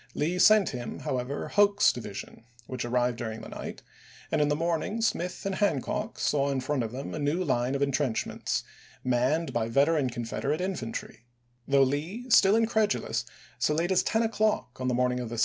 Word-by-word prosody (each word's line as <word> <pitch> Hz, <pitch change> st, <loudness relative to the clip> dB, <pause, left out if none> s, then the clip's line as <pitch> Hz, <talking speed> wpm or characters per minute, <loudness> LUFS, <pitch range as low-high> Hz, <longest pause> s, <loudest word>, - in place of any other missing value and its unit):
Lee 170 Hz, +5 st, 0 dB
sent 215 Hz, -1 st, +6 dB
him, 120 Hz, -3 st, -6 dB
however, 130 Hz, +2 st, -3 dB
Hoke's 205 Hz, 0 st, +4 dB
division, 110 Hz, -2 st, -8 dB, 0.2 s
which 130 Hz, 0 st, -4 dB
arrived 120 Hz, 0 st, 0 dB
during 110 Hz, -2 st, -4 dB
the -, -, -9 dB
night, -, -, -7 dB, 0.5 s
and -, -, +2 dB
in 150 Hz, -, +3 dB
the 145 Hz, -, +1 dB
morning 170 Hz, +7 st, -1 dB
Smith 180 Hz, -6 st, -1 dB
and 195 Hz, -, -1 dB
Hancock 190 Hz, -10 st, -1 dB
saw 140 Hz, -1 st, +1 dB
in 135 Hz, -1 st, 0 dB
front 130 Hz, +1 st, -1 dB
of 115 Hz, -2 st, -3 dB
them 130 Hz, +3 st, -6 dB
a -, -, -4 dB
new 150 Hz, +5 st, 0 dB
line 130 Hz, -3 st, 0 dB
of 140 Hz, -, +1 dB
intrenchments, 140 Hz, -4 st, -1 dB, 0.4 s
manned 130 Hz, +7 st, +1 dB
by 115 Hz, -1 st, 0 dB
veteran 140 Hz, +3 st, +2 dB
Confederate 120 Hz, +5 st, -2 dB
infantry; 125 Hz, -9 st, -5 dB, 0.4 s
though 140 Hz, 0 st, +5 dB
Lee, 160 Hz, -, -2 dB
still 195 Hz, -1 st, +6 dB
incredulous, 220 Hz, -2 st, +1 dB, 0.3 s
so 150 Hz, -, +2 dB
late 170 Hz, +4 st, 0 dB
as 185 Hz, -, +4 dB
ten 225 Hz, +1 st, +1 dB
o'clock 215 Hz, -, 0 dB
on 130 Hz, -, -1 dB
the 125 Hz, -, +1 dB
morning 125 Hz, 0 st, +1 dB
June, 125 Hz, -, -3 dB
1864. 115 Hz, 0 st, -5 dB
140 Hz, 185 wpm, -28 LUFS, 125-180 Hz, 0.5 s, sent